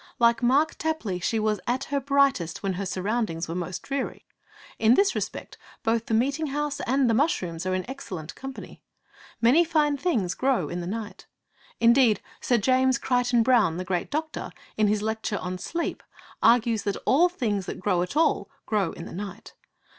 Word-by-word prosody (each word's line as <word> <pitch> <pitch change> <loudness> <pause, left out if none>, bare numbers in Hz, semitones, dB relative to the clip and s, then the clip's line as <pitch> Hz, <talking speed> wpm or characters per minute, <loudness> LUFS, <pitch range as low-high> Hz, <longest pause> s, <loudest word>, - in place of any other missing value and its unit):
Like 235 0 +3
Mark 275 +6 +3
Tapley, 315 - -2
she 225 +6 0
was 215 -1 0
at 250 +3 0
her 280 - +3
brightest 275 - +1
when 195 -1 0
her 195 +2 -3
surroundings 190 -3 -2
were 165 - -4
most 180 0 -4
dreary. 275 -1 -4 0.5
In 225 +2 +5
this 395 +4 +3
respect - - -5 0.2
both 230 0 0
the 225 - +1
meeting 280 +7 +1
house 290 +1 -2
and 265 +1 +3
the 230 - +3
mushrooms 190 - 0
are 185 - +1
in 185 - -3
excellent 185 - -7
company. 270 0 -9 0.6
Many 255 +9 +6
fine 305 -3 +1
things 235 - 0
grow 255 - 0
in 175 +1 -4
the 170 - -5
night. 215 +2 -6 0.5
Indeed, 235 -3 +5 0.2
Sir 245 - +2
James 260 +3 +3
Crichton 245 -2 +2
Browne, 225 -9 +3
the 185 - -4
great 180 -2 -2
doctor, 310 +1 -3 0.3
in 215 -1 +3
his 210 0 +1
lecture 220 -1 -2
on 185 0 -4
'Sleep,' 335 - -3 0.4
argues 230 -2 +4
that 200 - -2
all 340 +7 +5
things 215 - -2
that - - -5
grow 185 -2 +1
at 180 +11 -3
all 300 -11 +2 0.2
grow 205 -6 0
in 170 - -8
the - - -9
night. 200 +3 -7
230 Hz, 180 wpm, -26 LUFS, 190-270 Hz, 0.6 s, Many